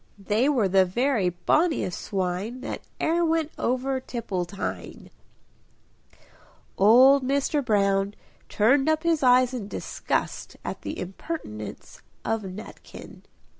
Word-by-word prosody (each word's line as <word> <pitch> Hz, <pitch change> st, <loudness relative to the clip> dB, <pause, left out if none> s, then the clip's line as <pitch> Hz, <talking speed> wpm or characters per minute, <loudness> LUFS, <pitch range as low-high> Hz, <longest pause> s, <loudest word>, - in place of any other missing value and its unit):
They 210 Hz, +7 st, +1 dB
were 245 Hz, -9 st, +2 dB
the 190 Hz, 0 st, +4 dB
very 225 Hz, +1 st, +1 dB
bonniest 230 Hz, -, 0 dB
swine 195 Hz, +6 st, -3 dB
That -, -, -5 dB, 0.2 s
e'er 340 Hz, +2 st, +1 dB
went 320 Hz, -2 st, +1 dB
over 260 Hz, +2 st, 0 dB
Tipple 220 Hz, -8 st, -4 dB
tine." 190 Hz, +3 st, -6 dB, 1.6 s
Old 260 Hz, +7 st, +6 dB
Mr. 280 Hz, +2 st, 0 dB
Brown 200 Hz, -3 st, +1 dB, 0.3 s
turned 270 Hz, +7 st, +3 dB
up 315 Hz, 0 st, +1 dB
his 330 Hz, -2 st, +2 dB
eyes 255 Hz, 0 st, +4 dB
in 230 Hz, -6 st, -4 dB
disgust -, -, -3 dB
at -, -, -5 dB
the -, -, -5 dB
impertinence 180 Hz, -, -7 dB, 0.2 s
of 225 Hz, 0 st, 0 dB
Nutkin. 195 Hz, +2 st, -10 dB
235 Hz, 115 wpm, -25 LUFS, 195-275 Hz, 1.6 s, Old